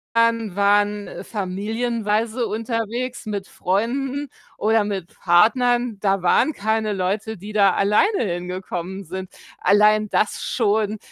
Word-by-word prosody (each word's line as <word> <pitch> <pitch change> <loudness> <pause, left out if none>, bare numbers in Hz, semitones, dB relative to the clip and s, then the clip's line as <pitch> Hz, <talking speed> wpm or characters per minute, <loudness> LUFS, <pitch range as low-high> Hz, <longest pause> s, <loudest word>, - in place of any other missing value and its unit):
waren 205 -2 +1
familienweise 220 +3 -2
unterwegs 230 +3 -3
mit 205 -2 -4
Freunden 265 +9 -2 0.3
oder 220 0 +2
mit 195 -4 -5
Partnern. 240 +6 +3
Da 195 -2 +1
waren 235 - +3
keine 220 0 -1
Leute, 200 +4 -2
die 205 +4 -9
da 200 -3 +4
alleine 215 - +2
hingekommen 180 0 -4
sind. 185 +2 -7 0.3
Allein 210 +1 +4
das 210 - 0
schon 215 -2 0
210 Hz, 110 wpm, -22 LUFS, 195-230 Hz, 0.3 s, da